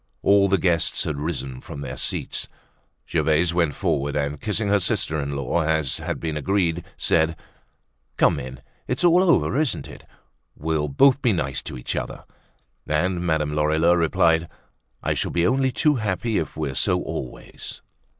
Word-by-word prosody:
All 100 0 +5
the 95 0 +3
guests 85 -4 +1
had 75 -3 -3
risen 65 -5 -4
from 70 - -8
their - - -5
seats; - - -2 0.6
Gervaise 80 +2 +2
went 85 -4 +1
forward 75 -6 -1
and 75 0 -2
kissing 105 0 0
her 100 0 +4
sister 80 -3 0
in 70 0 -3
law 70 +5 0
as 80 -3 0
had - - -4
been 80 -2 -3
agreed, 85 +1 0
said: 80 0 +2 0.8
"Come - - +3
in. 65 0 -8 0.3
It's 125 +5 -1
all 175 +1 +6
over, 170 -6 +3
isn't 155 - 0
it? - - -12 0.5
We'll 75 -1 -1
both 135 - +4
be 120 -5 +3
nice 70 -7 -2
to - - -7
each 60 - -4
other." - - -5 0.6
And 85 +4 0
Madame 80 -3 0
Lorilleux 80 +3 +3
replied: 80 0 +2 0.6
"I - - +1
shall - - -1
be 85 0 +1
only 130 +3 +2
too 150 +3 +2
happy 105 0 -1
if 80 - -5
we're 75 -4 -2
so - - +1
always." 60 - -7
80 Hz, 165 wpm, -23 LUFS, 75-100 Hz, 0.8 s, all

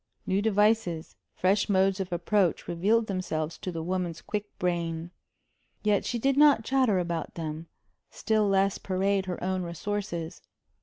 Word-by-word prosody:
New 195 +1 +1
devices, 210 -5 +1 0.2
fresh 195 +3 +2
modes 195 0 +3
of 190 -2 -3
approach 180 +1 +1
revealed 210 +7 +2
themselves 170 -5 -3
to 185 - -4
the 165 -2 -4
woman's 180 -2 -2
quick 210 -1 -4
brain. 170 -1 -2 0.7
Yet 210 -2 +2
she 240 - -1
did 270 +3 +1
not 290 -6 +6
chatter 260 -7 +2
about 170 -2 -3
them; 160 0 -5 0.4
still 215 -2 +1
less 195 0 +2
parade 190 0 0
her 180 - -3
own 185 0 0
resources. 175 0 -4
190 Hz, 145 wpm, -28 LUFS, 170-210 Hz, 0.7 s, not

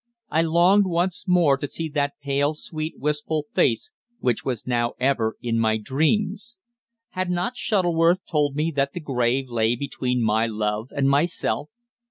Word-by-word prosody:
I 160 - +3
longed 175 +5 +4
once 175 +1 -1
more 170 -6 +4
to 145 - -4
see 165 +4 -4
that 145 -1 -1
pale, 145 +2 +1
sweet, 155 +1 -5
wistful 150 +1 -1
face 115 -3 +1 0.3
which 125 -3 0
was 125 -5 -3
now 120 -1 0
ever 125 -4 +1
in 115 -1 0
my 110 -1 +2
dreams. 190 - -1 0.5
Had 185 0 -3
not 180 +7 -1
Shuttleworth 175 -5 +2
told 145 -3 0
me 160 +2 0
that 140 0 0
the - - -4
grave 130 -3 0
lay 115 -1 +1
between 125 -2 -2
my 110 +1 +2
love 105 +1 -2
and 140 -1 0
myself? 145 0 0
145 Hz, 160 wpm, -24 LUFS, 125-170 Hz, 0.5 s, longed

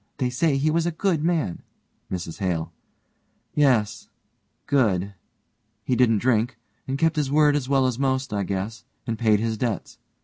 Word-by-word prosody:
They 125 -2 0
say 140 +2 +1
he 150 +3 +1
was 165 +1 +1
a - - 0
good 165 -2 0
man. 165 - 0 0.5
MRS 85 -1 -5
HALE: 85 -4 -2 0.8
Yes 125 -8 +2 0.6
good; 100 -8 +1 0.7
he 125 - 0
didn't 115 -3 +4
drink, 120 +1 +1 0.3
and 135 +1 -2
kept 160 +2 +1
his 145 -3 0
word 150 0 +4
as 135 -3 -2
well 135 -2 +3
as 130 -1 -1
most, 130 -3 0
I 100 - 0
guess, 100 +4 -4 0.2
and 115 -2 -3
paid 110 -3 +3
his 110 -1 -2
debts. 120 -4 -3
125 Hz, 165 wpm, -24 LUFS, 105-145 Hz, 0.8 s, didn't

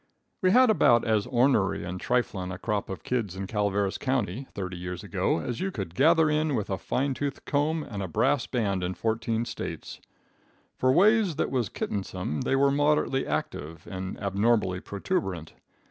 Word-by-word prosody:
We 185 - +4
had 250 +3 +6
about 120 - +4
as 110 -3 +1
ornery 120 -5 +2
and 90 +1 -5
triflin' 105 -7 -1
a 95 - -5
crop 105 0 -2
of 95 - -6
kids 110 -7 -2
in 95 +1 -4
Calaveras 100 -1 0
county, 130 -2 -1
thirty 95 -2 -4
years 90 +1 -6
ago, 95 -3 0
as 120 +7 -4
you 190 - -1
could 95 - -5
gather 160 - +4
in 150 -1 +1
with 105 -4 -2
a 95 - -1
fine 135 +1 -1
tooth 140 0 -4
comb 150 +2 0
and 105 -7 -6
a 95 - -3
brass 80 - +1
band 100 -6 -1
in 90 +1 -2
fourteen 115 +1 -1
States. - - -6 0.7
For 130 - +2
ways 200 - +4
that - - -1
was 120 -7 0
kittensome 95 -6 -3
they - - +1
were 140 +1 +4
moderately 145 -1 +2
active 75 +2 -4
and 95 0 -5
abnormally 100 -1 +1
protuberant. 95 - -3
110 Hz, 175 wpm, -27 LUFS, 95-140 Hz, 0.7 s, had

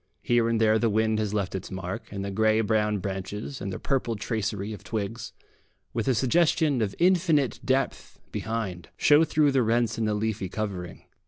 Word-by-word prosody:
Here 120 -1 +2
and 115 -1 +1
there 110 0 +4
the 115 - +2
wind 110 +1 +1
has 105 -2 -1
left 100 -3 -1
its 95 - -5
mark, 95 -1 -6
and 100 -1 -4
the 100 - -3
grey 110 +2 +3
brown 105 -1 +1
branches 100 +6 -5
and 100 - -3
their - - -4
purple 125 -4 -1
tracery 105 -1 -3
of 105 - -10
twigs, 110 +1 -4 0.6
with 115 0 -2
a 130 - +3
suggestion 145 +1 +2
of 100 -3 -1
infinite 170 - +3
depth 135 +1 -1
behind, 110 -6 -4
show 150 +2 +6
through 150 -2 +3
the 135 -1 +3
rents 115 -1 +1
in 110 - +1
the 105 -1 0
leafy 105 -3 -2
covering. 95 -4 -5
110 Hz, 185 wpm, -27 LUFS, 100-120 Hz, 0.6 s, show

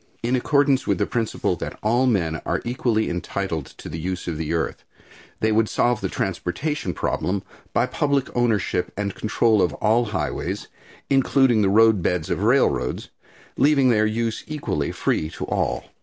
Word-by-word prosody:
In 120 +2 +1
accordance 140 +1 +2
with - - +2
the - - +1
principle 115 -3 -1
that - - -6
all 120 +4 +3
men 85 -9 0
are - - -2
equally 120 -2 0
entitled 90 -3 -3
to - - -9
the 80 +2 -5
use 90 +2 -4
of 85 - -2
the 80 0 -3
earth, 85 -1 -2 0.6
they 110 - +2
would 110 0 +2
solve 120 -2 +1
the 95 - -1
transportation 95 - -2
problem 95 +6 -1 0.3
by - - +2
public 140 -2 -1
ownership 115 -7 +1
and 100 -1 -2
control 110 -1 +2
of 90 - +1
all 115 +3 +2
highways, 105 -4 -3 0.4
including 135 -3 +4
the 100 - +3
roadbeds 100 -6 +3
of - - -1
railroads, 60 0 +1 0.5
leaving 140 -2 +4
their 110 -2 +3
use 115 +1 -2
equally 140 - -2
free 80 - -1
to - - -6
all. - - -2
110 Hz, 160 wpm, -23 LUFS, 90-120 Hz, 0.6 s, including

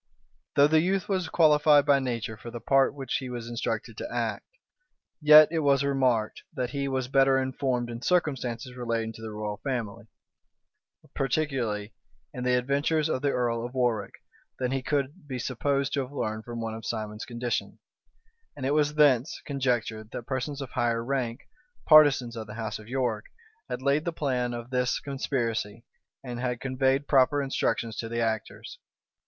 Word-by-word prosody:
[*] - - -45
Though 140 - +7
the 155 +1 +4
youth 195 +3 0
was 185 -4 -1
qualified 150 -2 +5
by 140 -1 +5
nature 120 -3 -3
for 120 - -10
the 120 0 -7
part 135 +3 +3
which 135 -3 -2
he 130 -1 -6
was 120 -2 -6
instructed 120 0 -3
to - - -6
act, - - -2 0.7
yet 150 0 +9
was 140 -4 +2
it - - 0
remarked, 125 -6 +1
that 125 -3 -2
he 140 0 -2
was 130 -2 -1
better 135 0 +4
informed 130 -2 -1
in 120 0 -7
circumstances 130 -8 -1
relating 115 -2 -2
to 110 - -12
the 110 - -6
royal 105 -1 -4
family, 115 -4 -4 1.1
particularly 125 -7 -1 0.4
in 125 - -5
the 125 0 +2
adventures 145 +5 +1
of 130 - -1
the 145 - +1
earl 120 -3 0
of 125 +2 -7
Warwick, 120 -5 0 0.4
than 125 -1 -1
he 135 0 -1
could 145 +4 -2
be 130 -2 -4
supposed 135 +3 -1
to 145 - +1
have 130 0 -6
learned 110 -5 -3
from 120 -1 -6
one 115 -1 -3
of 110 0 -8
Simon's 110 -1 -4
condition: 120 0 -3 0.8
and 130 - -5
it 140 - +1
was 150 0 +2
thence 145 -3 +3
conjectured, 120 -6 -1
that - - -5
persons 135 +2 -3
of 130 - -10
higher 115 -1 0
rank, 125 -2 -2 0.4
partisans 145 -6 +6
of 110 -2 -6
the 105 - -8
house 110 -2 -4
of 105 - -13
York, 120 -5 -1 0.4
had - - -4
laid 140 +3 +2
the 170 - 0
plan 130 -6 -1
of 120 +1 -8
this 125 -1 +1
conspiracy, 115 -5 -3 0.4
and 120 -2 -6
had 125 -1 -2
conveyed 135 +1 0
proper 140 +1 +4
instructions 115 -5 -1
to 115 - -4
the 115 0 -2
actors. 115 - -3
130 Hz, 175 wpm, -27 LUFS, 115-140 Hz, 1.1 s, yet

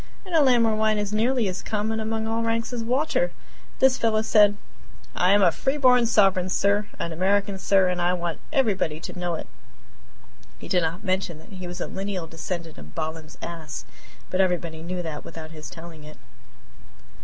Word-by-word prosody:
in 365 - -8
a 320 - +6
land 250 -4 +5
where 225 -1 +3
wine 215 0 +2
is 205 0 -2
nearly 235 +1 +2
as 185 -1 -3
common 220 +1 -2
among 220 0 -2
all 225 +1 -1
ranks 230 +1 -1
as 235 -2 -2
water! 290 - +1 0.5
This 265 -1 +4
fellow 220 -1 +2
said: 210 -2 +5 0.6
"I 180 - +3
am 205 0 +5
a 175 - +6
free 270 - -1
born 250 -4 +5
sovereign, 195 -5 +3
sir, 200 +2 +2
an 170 - -3
American, 195 +3 +1
sir, 190 +1 +4
and 180 -1 -1
I 175 +1 +2
want 175 -2 -3
everybody 205 - +1
to 180 - -7
know 175 -1 -1
it!" - - -6 1.1
He - - -10
did 180 - +2
not 165 +4 -2
mention 185 -4 -1
that 160 - -16
he 185 -1 -7
was 175 +1 -6
a - - -2
lineal 195 -3 -4
descendant 165 0 -6
of 75 +1 -13
Balaam's 160 0 -5
ass, 160 -3 -6 0.5
but 185 - +3
everybody 175 -3 -1
knew 175 +2 -4
that 155 -3 -5
without 160 -1 -9
his 155 -1 -8
telling 165 +2 -10
it. 155 -2 -12
190 Hz, 190 wpm, -25 LUFS, 170-220 Hz, 1.1 s, a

